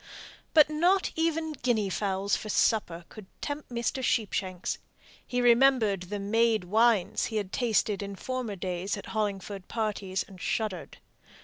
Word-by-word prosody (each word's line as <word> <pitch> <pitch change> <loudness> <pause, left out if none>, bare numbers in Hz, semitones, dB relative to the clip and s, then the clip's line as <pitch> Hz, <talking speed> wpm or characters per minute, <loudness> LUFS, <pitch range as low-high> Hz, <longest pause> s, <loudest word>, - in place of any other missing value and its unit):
But 305 -2 +8
not 350 +6 +2
even 325 -1 0
guinea 230 -8 0
fowls 195 0 0
for 215 - -6
supper 175 -6 +1
could 215 -4 -11
tempt 290 0 -5
Mr. 240 +2 -2
Sheepshanks. 190 -6 -1 0.5
He 250 -1 0
remembered 240 -5 +4
the 205 - -2
made 220 +1 +2
wines 215 0 +2
he 225 - -5
had 205 -3 -2
tasted 215 -4 +1
in 200 0 -5
former 250 -1 -4
days 185 +2 -3
at 200 - -8
Hollingford 200 -2 -3
parties, 205 -4 -2
and 190 -2 -13
shuddered. 210 -6 -3
215 Hz, 140 wpm, -28 LUFS, 195-245 Hz, 0.5 s, But